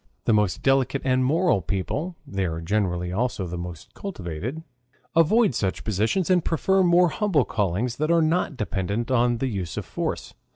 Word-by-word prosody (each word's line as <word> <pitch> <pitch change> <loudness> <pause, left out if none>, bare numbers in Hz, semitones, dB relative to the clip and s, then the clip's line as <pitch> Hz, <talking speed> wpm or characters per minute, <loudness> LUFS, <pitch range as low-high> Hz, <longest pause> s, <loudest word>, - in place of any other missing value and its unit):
The 115 - +3
most 105 -4 +1
delicate 135 0 +2
and 130 -1 +2
moral 160 - +2
people 120 - -3
(they 95 -7 -2
are 80 -2 -3
generally 90 -1 -1
also 110 -2 -1
the 90 0 -5
most 85 -2 -8
cultivated) 120 - -5 0.5
avoid 165 - +4
such 95 -4 -2
positions 110 - 0
and 180 -3 +3
prefer 190 +4 +2
more 175 0 +5
humble 165 - +1
callings 105 +4 -1
that 155 +2 -1
are 170 -1 +4
not 155 -3 0
dependent 105 +3 -2
on 120 -1 +3
the 135 - -1
use 95 -8 -4
of - - -3
force. - - -4
120 Hz, 170 wpm, -24 LUFS, 95-160 Hz, 0.5 s, more